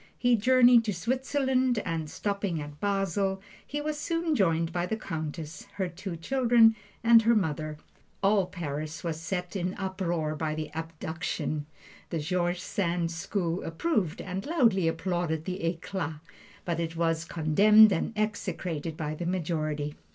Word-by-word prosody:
He 245 -1 +4
journeyed 245 +1 +6
to 210 -3 -1
Switzerland, 260 +3 +1
and 165 -3 -2
stopping 200 -2 -2
at 145 0 -8
Basle 195 -1 0 0.3
he 295 +1 -3
was 300 0 -3
soon 330 +1 0
joined 165 - +2
by 175 0 -1
the 220 - -2
Countess, 160 -4 -5
her 190 -2 -1
two 175 +1 -6
children, 235 +3 +4 0.3
and 230 0 +7
her 230 +1 +4
mother. 155 -5 -1 0.5
All 195 -2 +4
Paris 155 -3 -5
was 165 -2 -3
set 180 +2 -3
in 180 -2 0
an 185 - -3
uproar 180 -5 -2
by 155 0 -2
the 155 -1 -4
"abduction." 160 -1 -4 0.4
The 165 - -2
George 175 +3 -1
Sand 175 -4 -1
school 170 +1 -2
approved 180 - -1
and 190 +1 -4
loudly 230 - +3
applauded 165 -1 -1
the 185 -1 -4
"eclat"; 165 -1 -2 0.5
but 170 -1 -1
it 165 -1 -3
was 165 -1 +1
condemned 200 +7 +6
and 170 - -1
execrated 175 -7 -2
by 155 -1 -3
the 170 +2 -4
majority. 155 -4 -1
180 Hz, 150 wpm, -28 LUFS, 160-210 Hz, 0.5 s, and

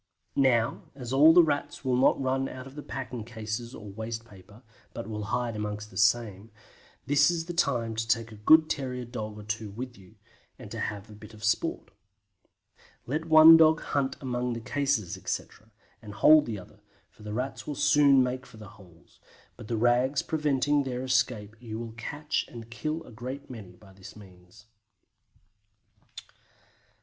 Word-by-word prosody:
Now 120 -4 +2
as 125 -2 -6
all 150 +4 +7
the 175 +1 +7
Rats 145 -2 -2
will 130 -1 +2
not 130 +2 +3
run 135 0 -1
out 130 0 -9
of 135 - -12
the 150 - -8
packing 125 -5 -6
cases 110 +2 -6
or 105 -2 -10
waste 115 +2 -6
paper, 100 +3 -16 0.3
but 115 - -5
will 105 -1 -5
hide 120 +1 -2
amongst 105 0 -5
the - - -15
same, 110 -2 +1 0.6
this 145 +2 +4
is 170 -2 -2
the 175 - -5
time 125 -9 0
to 115 0 -2
take 115 0 0
a - - -10
good 155 +7 +6
terrier 125 -4 -3
dog 110 -3 -6
or 105 - -9
two 110 0 -4
with 120 +3 -8
you, 95 -2 -18 0.4
and - - -11
to - - -5
have 105 -1 -4
a 110 - -13
bit 105 +1 -13
of 110 - -14
sport. 110 - -1 1.1
Let 155 +6 -3
one 160 0 +9
dog 160 0 +5
hunt 140 -4 -2
among 125 -2 -2
the 115 - -4
cases, 125 -4 -1
etc., 110 - -6 0.3
and 105 -3 -10
hold 155 +3 +6
the 110 -3 -4
other, 95 +2 -14 0.3
for 120 - -21
the 105 0 -6
Rats 130 +3 -4
will 150 - -3
soon 145 -2 +5
make 130 +1 -4
for 125 -3 -15
the 105 -2 -11
holes, 90 -6 -19 0.4
but - - -11
the 115 - -2
rags 125 +4 +2
preventing 145 -2 +1
their 130 -2 -4
escape 125 -5 0
you 110 -2 -6
will 115 0 -6
catch 145 +6 -3
and 115 -1 -11
kill 155 +7 -4
a 125 - -14
great 130 +5 -7
many 100 -7 -10
by 95 0 -18
this 95 -1 -13
means. 95 -2 -16
120 Hz, 180 wpm, -28 LUFS, 110-135 Hz, 1.1 s, one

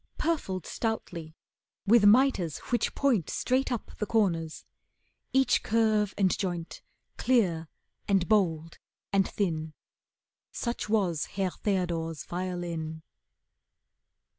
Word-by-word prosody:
Purfled 280 - -1
stoutly, 170 -8 -4 0.5
with 210 0 +6
mitres 210 - +4
which 240 -2 +1
point 240 - +2
Straight 260 +1 0
up 240 - -3
the 210 - -1
corners. 170 -8 0 0.7
Each 265 0 +3
curve 215 -3 +2
and 190 -3 +3
joint 175 -3 -4 0.4
Clear, 180 -11 +2 0.4
and 195 -3 +2
bold, 165 -7 +1 0.3
and 195 -1 +3
thin. 160 -5 -2 0.8
Such 235 -3 -3
was 185 -8 +1
Herr 190 -2 -2
Theodore's 170 -6 -2
violin. 170 -3 -4
190 Hz, 100 wpm, -29 LUFS, 165-220 Hz, 0.8 s, with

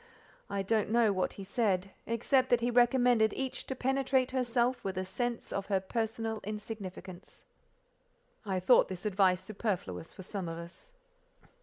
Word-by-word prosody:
I 200 -1 -1
don't 215 +1 +1
know 225 -2 +4
what 185 -1 -1
he 195 - -8
said, 195 -3 0 0.2
except 255 +3 +2
that 245 -1 +4
he 240 +1 +1
recommended 240 -2 +4
each 265 -1 -3
to 265 - -3
penetrate 265 0 +1
herself 245 -1 +1
with 190 -1 -3
a 185 - -1
sense 240 +5 -3
of 195 0 -3
her 195 -2 +2
personal 225 +2 -2
insignificance. 195 -3 -8 1.0
God 210 - -10
knows 190 - +1
I - - +1
thought 250 - +6
this 185 +1 -7
advice 185 -3 +3
superfluous 185 - -3
for 190 - -10
some 190 -2 -4
of 165 - -5
us. 170 - -11
215 Hz, 165 wpm, -31 LUFS, 190-245 Hz, 1.0 s, thought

